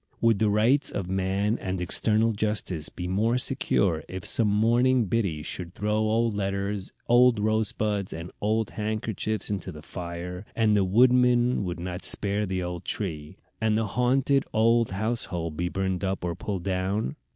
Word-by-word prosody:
Would 115 -3 +3
the 110 - +3
rights 115 +7 +3
of 95 -2 -4
man 95 +4 0
and 95 0 -3
eternal 110 +5 +2
justice 100 -7 -2
be 90 - -6
more 110 +6 +1
secure 100 - +1
if 95 -1 -6
some 115 - +3
morning 120 +4 +3
Biddy 95 -8 -1
should 90 +3 -6
throw 105 -1 -1
old 110 +1 +1
letters, 100 0 -3 0.2
old 120 -1 +5
rose 110 +1 +1
buds, 105 -3 -2
and 80 +2 -7
old 110 +1 0
handkerchiefs 110 0 -3
into 100 -4 -3
the 75 0 -11
fire, 90 +2 -6
and 110 -2 +3
the 100 - +3
woodman 125 +2 +4
would 85 -1 -4
not 90 +1 -5
spare 105 0 +1
the 95 -1 -2
old 90 -1 -5
tree, 80 -7 -4 0.2
and 110 -1 +2
the 110 - 0
haunted 135 +2 +2
old 115 +1 +3
household 95 -6 -3
be 85 +2 -1
burned 95 0 -2
up 95 -1 -2
or 85 - -1
pulled 95 -1 -4
down? 95 +6 -1
105 Hz, 165 wpm, -26 LUFS, 95-115 Hz, 0.2 s, old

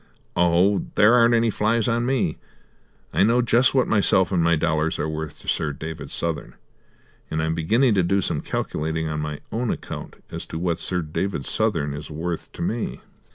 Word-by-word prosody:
Oh, 90 +3 +3
there 105 +3 +6
aren't 120 -1 +5
any 115 -1 +2
flies 110 +2 +1
on 120 0 +1
me! 130 -2 0 0.7
I - - +2
know 115 +5 +4
just 120 +3 +3
what 130 - +3
myself 95 -3 +3
and 85 -3 +2
dollars 80 -1 0
are 75 - -1
worth 80 -1 -5
to - - -16
Sir 75 -2 0
David 80 -1 -7
Southern, 85 -2 -1 0.7
and 80 - -2
I'm 80 +1 0
beginning 110 +10 +2
to 95 - +3
do 95 +3 +2
some 95 - -1
calculating 80 +1 -2
on 75 -1 -3
my 75 -1 -4
own 120 +1 -1
account - - -5 0.2
as - - -6
to - - -5
what 85 0 -1
Sir 90 -2 0
David 80 0 -3
Southern 70 0 +1
is 75 +2 -7
worth 80 +2 -4
to - - -5
me." 110 +6 -3
85 Hz, 185 wpm, -23 LUFS, 80-110 Hz, 0.7 s, there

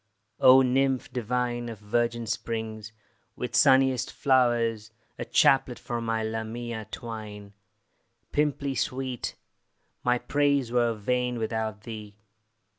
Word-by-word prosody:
O, 130 +1 +8
nymph 130 0 +1
divine 120 0 -2
Of 115 - -7
virgin 115 +3 -1
springs, 110 0 -4 0.4
with - - -4
sunniest 130 -2 +4
flowers 120 -4 +2 0.3
A 120 - -3
chaplet 125 +1 +3
for 120 -1 -4
my 115 -1 -1
Lamia 110 0 -4
twine, 105 -4 -8 0.8
Pimplea 145 -2 0
sweet! 130 0 -3 0.7
my 125 0 +3
praise 140 -2 +1
were 120 -2 +2
vain 125 +3 -1
Without 110 -2 -3
thee. 110 -2 -9
120 Hz, 110 wpm, -27 LUFS, 110-125 Hz, 0.8 s, O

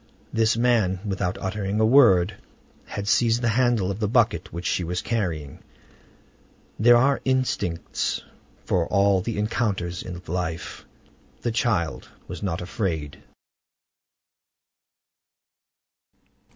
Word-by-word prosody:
This 115 0 +2
man, 115 -6 +2
without 95 -2 -2
uttering 100 +1 -2
a 110 - +4
word, 110 -7 +5 0.5
had 100 0 -5
seized 115 +3 +2
the 120 - +2
handle 115 -4 +2
of 100 - -5
the 105 - 0
bucket 120 +1 +1
which 85 +1 -6
she 90 - 0
was 90 +1 -2
carrying. 85 - -3 1.2
There 120 +2 +7
are 135 +3 +2
instincts 120 -10 -1 0.4
for 85 -3 +1
all 100 -1 +3
the 115 +3 -4
encounters 105 -5 -1
of 90 0 -8
life. 85 -1 -4 0.6
The 120 - 0
child 110 - -1 0.2
was 90 - -7
not 90 -5 -2
afraid. 85 -6 -3
100 Hz, 110 wpm, -24 LUFS, 90-115 Hz, 1.2 s, There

